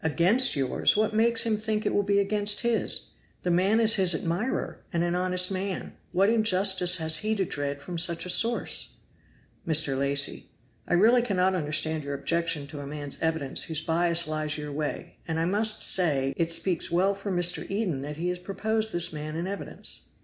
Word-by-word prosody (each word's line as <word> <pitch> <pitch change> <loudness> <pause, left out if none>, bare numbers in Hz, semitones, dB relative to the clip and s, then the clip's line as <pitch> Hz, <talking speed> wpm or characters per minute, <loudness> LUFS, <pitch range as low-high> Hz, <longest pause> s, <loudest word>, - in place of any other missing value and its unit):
"Against 175 - +3
yours? 135 +7 +1
what 215 0 +1
makes 230 +1 +3
him 220 -2 +1
think 215 0 -2
it - - 0
will - - +2
be 200 0 0
against 205 +1 0
his? 235 -1 +1 0.3
The 180 - 0
man 190 +6 +3
is 225 -1 +4
his 185 -3 +3
admirer, 175 +11 -3
and 170 -1 0
an 175 0 -1
honest 180 +1 +1
man. 190 0 -4 0.2
What 190 +2 +2
injustice 190 -5 +3
has 160 -2 +2
he 215 +3 -1
to 195 -2 0
dread 140 -2 -4
from 175 -2 -4
such 170 +1 +1
a - - -6
source?" 235 +5 0 0.7
Mr. 155 -4 +3
Lacy. 140 +1 +1 0.4
"I - - +1
really 230 +7 +5
cannot 190 -5 +1
understand 155 -2 -1
your 140 0 -4
objection 165 0 -1
to 145 - -8
a 140 - -7
man's 145 -1 -5
evidence 160 -4 -1
whose 160 -1 -3
bias 170 +1 +1
lies 155 -1 -2
your 150 -1 -6
way; 150 +1 -5
and 160 -1 -2
I 165 - 0
must 215 +4 +2
say, 140 -7 +3
it 165 -1 -1
speaks 165 +1 0
well 185 +4 +2
for 195 0 -6
Mr. 175 -1 0
Eden 195 -9 -2
that 150 +2 -7
he 175 +2 -2
has 180 0 -3
proposed 220 +4 -2
this 175 -2 -1
man 155 0 -6
in 170 +2 -3
evidence." 200 +1 -6
175 Hz, 195 wpm, -26 LUFS, 160-200 Hz, 0.7 s, really